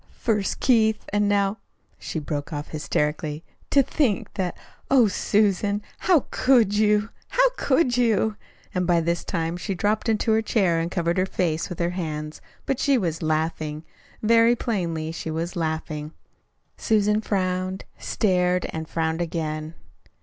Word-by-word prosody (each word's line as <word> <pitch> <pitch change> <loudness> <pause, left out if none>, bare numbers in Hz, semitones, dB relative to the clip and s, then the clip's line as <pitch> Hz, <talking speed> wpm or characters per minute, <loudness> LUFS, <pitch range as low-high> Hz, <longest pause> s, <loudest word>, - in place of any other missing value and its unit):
First 210 -4 0
Keith, 220 -4 +3
and 205 0 +2
now 200 +1 +1 0.2
" - - -44
She - - -5
broke 145 -1 -4
off 145 -1 -5
hysterically. 150 0 -2 0.3
"To 275 - +5
think 260 -5 0
that 185 -3 -2 0.3
Oh, 255 -4 +6
Susan, 205 +1 +1 0.2
how 350 -7 +3
could 240 -6 +4
you, 210 0 +3 0.2
how - - +3
could 260 - +2
you!" 220 -3 +2 0.4
And 180 -1 -1
this 170 0 +2
time 165 -1 -2
she 180 +3 -3
dropped 215 +4 0
into 220 0 +2
a 220 - +3
chair 190 -7 +2
and 165 +1 -1
covered 170 0 0
her 185 - +1
face 165 -3 -1
with 180 - -6
her 170 0 0
hands. 155 -4 -5 0.2
But 270 - -1
she 280 -2 +3
was 170 -7 -2
laughing. 155 -1 -1 0.4
Very 230 +2 +5
plainly 170 -9 -2
she 165 - -5
was 165 +3 -3
laughing. 160 -2 -3 0.6
Susan 210 -1 +2
frowned, 185 -2 -1 0.2
stared, 180 -3 +1
and 160 0 -5
frowned 160 0 -1
again. 160 -2 -3
185 Hz, 150 wpm, -24 LUFS, 160-215 Hz, 0.6 s, Oh